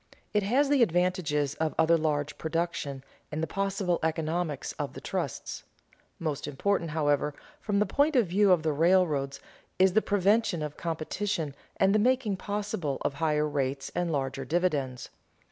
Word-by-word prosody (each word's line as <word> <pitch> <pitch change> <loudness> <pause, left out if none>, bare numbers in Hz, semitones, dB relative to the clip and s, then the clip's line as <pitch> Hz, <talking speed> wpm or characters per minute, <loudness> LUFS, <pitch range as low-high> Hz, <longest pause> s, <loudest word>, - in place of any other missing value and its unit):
It 210 - +3
has 255 +9 +2
the 285 -3 +4
advantages 175 - +1
of 155 +1 -2
other 160 +1 +5
large 150 -2 -1
production 160 -4 -2 0.3
and 155 +1 -2
the - - +3
possible 195 -1 -1
economies 160 -1 -1
of - - -3
the - - -8
trusts. - - -4 0.5
Most 150 -3 -3
important, 170 +4 0
however, 150 -1 +1 0.2
from 205 -2 -1
the 210 - +3
point 285 +9 +2
of 245 -4 +5
view 195 +3 +3
of 175 -4 +4
the 155 -2 +1
railroads, 155 -4 +2 0.4
is 185 0 +4
the 220 - +4
prevention 200 -4 +2
of 150 -1 -5
competition 165 0 -2 0.2
and 195 +1 +4
the 215 - +4
making 245 -3 +2
possible 200 -8 -3
of - - -1
higher 150 +1 +1
rates 135 -1 -2
and 175 -1 -1
larger 135 -2 -2
dividends. 140 -5 -1
165 Hz, 160 wpm, -28 LUFS, 150-195 Hz, 0.5 s, other